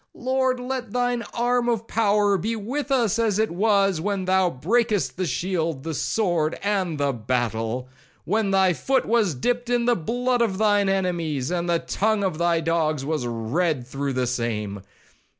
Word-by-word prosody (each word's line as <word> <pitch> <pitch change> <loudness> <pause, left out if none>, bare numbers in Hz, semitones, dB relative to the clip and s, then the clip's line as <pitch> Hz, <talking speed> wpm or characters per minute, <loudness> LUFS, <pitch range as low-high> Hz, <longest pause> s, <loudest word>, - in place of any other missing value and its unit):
—Lord, 260 0 0
let 250 -3 -4
thine 245 -1 0
arm 240 0 +1
of 230 -1 -1
power 205 -2 +2
be 215 +5 -1
with 260 +7 -4
us 235 -5 +2
as 220 -4 +1
it 220 -2 +1
was 195 -2 +2
when 200 0 -2
thou 185 -1 +3
brakest 210 - 0
the 185 -1 -2
shield, 165 -1 -2
the 160 - -3
sword, 170 -3 0
and 190 -6 0
the 140 -1 0
battle.—when 125 - -2
thy 190 -2 +3
foot 265 +9 0
was 215 - +2
dipped 245 - -1
in 240 -1 +1
the 240 0 +3
blood 245 +7 0
of 205 -5 +1
thine 205 -2 +3
enemies, 170 -7 -1
and 175 -1 -1
the 170 - +3
tongue 210 +4 0
of 185 -5 -1
thy 170 -1 +2
dogs 155 -4 0
was 150 -5 -1
red 125 +5 -1
through 135 +2 -3
the 130 0 0
same. 110 -5 -3
190 Hz, 170 wpm, -24 LUFS, 155-225 Hz, -, thou